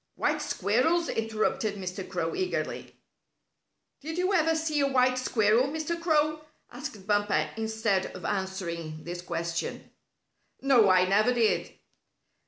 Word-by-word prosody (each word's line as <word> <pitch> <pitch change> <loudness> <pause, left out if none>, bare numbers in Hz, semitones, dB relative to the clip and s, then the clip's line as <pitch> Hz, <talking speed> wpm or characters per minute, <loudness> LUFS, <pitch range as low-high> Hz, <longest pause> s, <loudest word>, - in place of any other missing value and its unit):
"White 300 0 0
squirrels?" 295 +4 +1
interrupted 220 -1 -1
Mr. 185 -1 -6
Crow, 165 -2 -2
eagerly. 370 -1 -3 1.0
"Did 320 +3 -6
you 365 +2 +1
ever 325 -3 +3
see 315 -2 0
a 280 - +3
white 255 -1 +3
squirrel, 225 -1 +3
Mr. 315 +3 -3
Crow?" 310 -2 +2 0.3
asked 240 -6 -8
Bumper, 205 -7 +1
instead 220 -3 0
of 185 - -8
answering 170 -5 -3
this 175 +1 -6
question. 170 -1 -4 0.7
"No, 250 -7 +5
I 185 0 +5
never 210 +6 +3
did." 230 -3 +1
220 Hz, 125 wpm, -28 LUFS, 190-300 Hz, 1.0 s, No